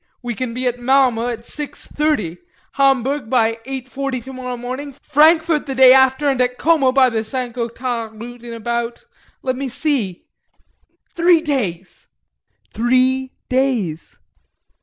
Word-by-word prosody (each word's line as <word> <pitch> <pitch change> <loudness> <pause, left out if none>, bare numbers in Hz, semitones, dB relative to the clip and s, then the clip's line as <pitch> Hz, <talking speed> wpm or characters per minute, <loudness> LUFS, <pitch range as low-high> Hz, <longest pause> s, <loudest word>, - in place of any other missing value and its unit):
We 240 -1 -3
can 235 +1 -4
be 255 +1 -3
at 245 0 -1
Malmö 245 -2 +2
at 230 -1 -6
6.30, 290 - -3 0.3
Hamburg 270 -2 +1
at 225 -2 +1
8.40 265 0 -4
tomorrow 255 -1 -6
morning, 255 +3 -6
Frankfort 315 +1 +3
the 270 - -3
day 260 0 +8
after 265 +2 +4
and 270 -2 +2
at 250 0 0
Como 310 -5 +3
by 260 -1 +4
the 220 -1 -1
St. 250 +1 -4
Gothard 235 -2 -4
route 240 +1 -9
in 240 - -8
about 235 +1 -3 0.4
let 255 -1 -1
me 270 +1 -4
see, 250 - -2 0.9
three 340 -1 +4
days. 205 - -3 0.7
Three 255 +3 +1
days! 245 - -1
255 Hz, 135 wpm, -19 LUFS, 235-270 Hz, 0.9 s, day